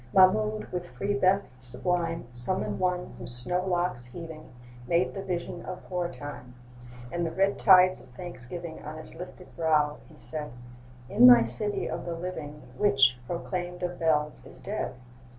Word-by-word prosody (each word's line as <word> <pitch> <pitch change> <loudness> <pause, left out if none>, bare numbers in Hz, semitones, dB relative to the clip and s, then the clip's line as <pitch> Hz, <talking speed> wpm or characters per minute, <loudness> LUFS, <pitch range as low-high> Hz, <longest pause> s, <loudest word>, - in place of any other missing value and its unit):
Mahmoud, 215 +3 +5
with 175 -1 -4
free 205 +1 -2
breath 195 -6 +2
sublime, 165 +7 -2
Summoned 125 +11 +2
one 180 -1 -1
whose 120 - -5
snow 180 +9 0
locks 175 -9 -1
heaving 160 +4 -9 0.4
Made 170 +1 +2
the 195 - -4
vision 175 -2 -4
of 185 - -7
hoar 180 -1 -2
Time; 125 -6 -9 0.6
And 175 0 -1
the 165 - 0
red 195 +4 +1
tides 185 -2 +7
of - - -17
thanksgiving 170 +2 -7
On 155 +1 -7
his 155 - -9
lifted 180 +1 -10
brow, 150 -2 +2
he 155 - -17
said: 150 -5 -5 0.5
'In 230 - +7
my 245 -1 +9
city 205 -1 -1
of - - -4
the 170 - -2
living, 160 -4 -6
Which, 135 -11 +4
proclaimed 175 +1 -4
of 175 0 -3
bells, 150 -2 +1
is - - -13
dead? 205 -8 -4
175 Hz, 160 wpm, -28 LUFS, 150-185 Hz, 0.6 s, my